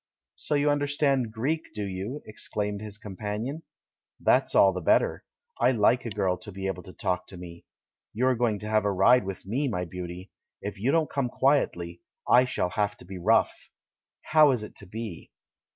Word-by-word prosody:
"So 150 - -2
you 145 0 +3
understand 140 -4 +1
Greek, 130 +3 -3
do 105 - -3
you?" 100 +9 -5
ex 110 - -6
claimed 105 -1 -2
his 105 -1 -6
companion. 105 - -5 0.6
"That's - - +3
all - - +6
the - - -4
better - - +2 0.2
— 475 0 -41
I - - +5
like 120 +2 +3
a - - -2
girl 95 -3 0
to 105 - -9
be 95 0 -6
able 95 -1 -2
to 90 - -12
talk 90 -2 -2
to 95 - -10
me! 85 -1 -10 0.5
You 120 +4 0
are 130 - +4
going 115 -3 +1
to 105 - -5
have 110 -1 +2
a 100 - +1
ride 100 +5 +5
with 95 -1 -6
me, 130 +9 -1
my 90 -7 -2
beauty. 90 +2 -7 0.3
If 100 -1 -6
you 120 +7 +1
don't 160 -1 +2
come 135 -3 0
quietly, 90 -12 +1 0.3
I 125 +1 +6
shall 110 -7 -1
have 105 +1 -1
to - - -13
be 95 0 -8
rough! 110 +6 +3 0.7
How 155 -1 +5
is 125 -5 +1
it 105 - -10
to 100 - -9
be?" 110 -3 -7
105 Hz, 200 wpm, -27 LUFS, 95-130 Hz, 0.7 s, all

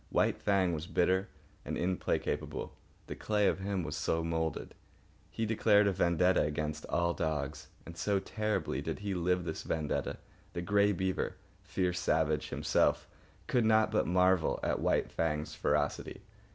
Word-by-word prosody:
White - - +1
Fang 95 -4 +2
was 80 +1 -4
bitter 95 +2 +1 0.3
and - - -4
implacable. 90 +1 -2 0.3
The - - -6
clay 105 -2 +1
of - - +1
him 95 -1 -2
was 75 -1 -4
so 80 0 0
moulded. 80 -1 -2 0.6
He 115 - -2
declared 105 -1 +4
a 100 - +3
vendetta 90 0 +3
against 75 0 -2
all 85 0 +1
dogs. 75 -5 -3 0.2
And 85 - -9
so 100 +3 0
terribly 105 +2 -2
did - - -3
he 100 -1 -2
live 90 0 +1
this 80 -1 -4
vendetta 80 -2 -2 0.4
that 85 - -3
Grey 105 +2 +3
Beaver, 95 0 -1 0.3
fierce 90 -1 -1
savage 75 -1 +1
himself, - - +1 0.4
could 125 - +2
not 110 0 +4
but - - +1
marvel 90 -1 +3
at - - 0
White - - +1
Fang's 75 -2 -1
ferocity. - - -1
90 Hz, 150 wpm, -32 LUFS, 80-100 Hz, 0.6 s, declared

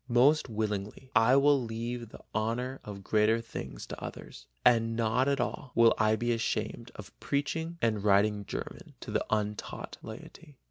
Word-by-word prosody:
Most 135 +5 +4
willingly 105 +3 -3
I 115 +3 +6
will 140 0 +5
leave 115 0 -4
the - - -12
honor 120 +5 -1
of 100 -2 -8
greater 110 +3 +3
things 115 0 -7
to - - -8
others, - - -9 0.2
and 115 -2 +4
not 115 +3 +2
at 140 -1 +1
all 125 +2 -3
will 115 0 +6
I 110 0 +4
be 120 +2 -1
ashamed 115 -1 -2
of - - -10
preaching 160 +4 -2
and 110 -3 +1
writing 105 0 +3
German - - -7
to - - -7
the - - +1
untaught 105 -1 -3
laity." 150 -5 -11
115 Hz, 165 wpm, -30 LUFS, 110-130 Hz, 0.2 s, I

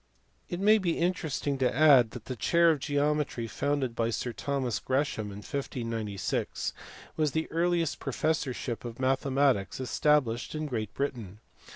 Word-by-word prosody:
It 175 - -3
may 215 +2 +5
be 175 -4 0
interesting 155 -5 -1
to 125 -2 +2
add 135 -5 +6
that 120 -2 -10
the 130 - -4
chair 170 +6 +4
of 155 - -1
geometry 145 -3 0
founded 130 +3 -1
by 115 -1 0
Sir 120 +1 -3
Thomas 135 -4 -2
Gresham 130 -5 -1
in 100 0 -8
1596 115 -7 -3 0.4
was 155 -3 +1
the 160 0 -1
earliest 170 -2 +1
professorship 135 -4 -2
of 120 0 -7
mathematics 130 -4 +1
established 130 -1 +1
in 155 0 -2
Great 110 -7 -3
Britain. 115 -8 -4
135 Hz, 145 wpm, -29 LUFS, 120-150 Hz, 0.4 s, add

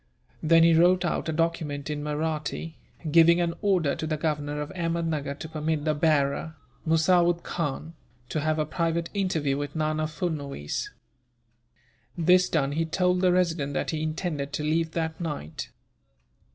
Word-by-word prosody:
Then 165 +1 +5
he 165 0 +6
wrote 175 +2 +4
out 170 - -1
a - - +1
document 155 -3 -1
in 150 -1 -3
Mahratti, 155 +1 -3 0.4
giving 170 +2 +6
an 170 -1 0
order 185 -8 +2
to 155 - -3
the 155 -1 -1
governor 150 -1 -2
of 150 0 -4
Ahmednuggur 165 -5 -2
to 160 - -7
permit 155 -1 -2
the 155 - +2
bearer, 150 0 +1 0.3
Musawood 170 +2 +3
Khan, 160 0 -3 0.4
to 155 - -1
have 155 +1 0
a 155 - +1
private 165 +1 -1
interview 160 -9 0
with 145 +1 -5
Nana 155 0 0
Furnuwees. 145 - -4 1.3
This 180 +2 +4
done, 140 -4 +1
he 160 +3 0
told 180 +2 +1
the 185 -1 +4
resident 165 -6 0
that - - -1
he 155 -1 -2
intended 155 -3 -3
to 150 - -2
leave 160 +1 0
that 160 0 -3
night. 145 - -5
160 Hz, 155 wpm, -26 LUFS, 150-170 Hz, 1.3 s, he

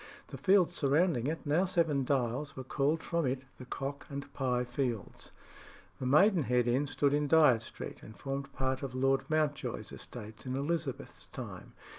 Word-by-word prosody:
The - - -7
fields 190 -3 +4
surrounding 145 -3 +2
it, 160 +1 -3
now 150 +5 +3
Seven 165 -6 +2
Dials, 130 +1 -1
were 130 - -5
called 145 +5 0
from 170 -4 0
it 130 +1 -2
the 125 - -8
Cock 140 +3 -5
and 140 0 -6
Pye 125 -3 0
Fields. 125 -4 -3 0.7
The 130 - -2
Maidenhead 145 - +4
Inn 130 +4 +1
stood 140 +1 +1
in 145 0 +2
Dyot 150 -8 +6
Street, - - -8
and 110 - -12
formed 140 0 -4
part 130 -1 -1
of 135 -3 -5
Lord 135 +1 +1
Mountjoy's 155 -2 -1
estates 110 +1 -8
in 130 -1 -3
Elizabeth's 145 -1 -3
time. - - -8
140 Hz, 165 wpm, -32 LUFS, 130-155 Hz, 0.7 s, Dyot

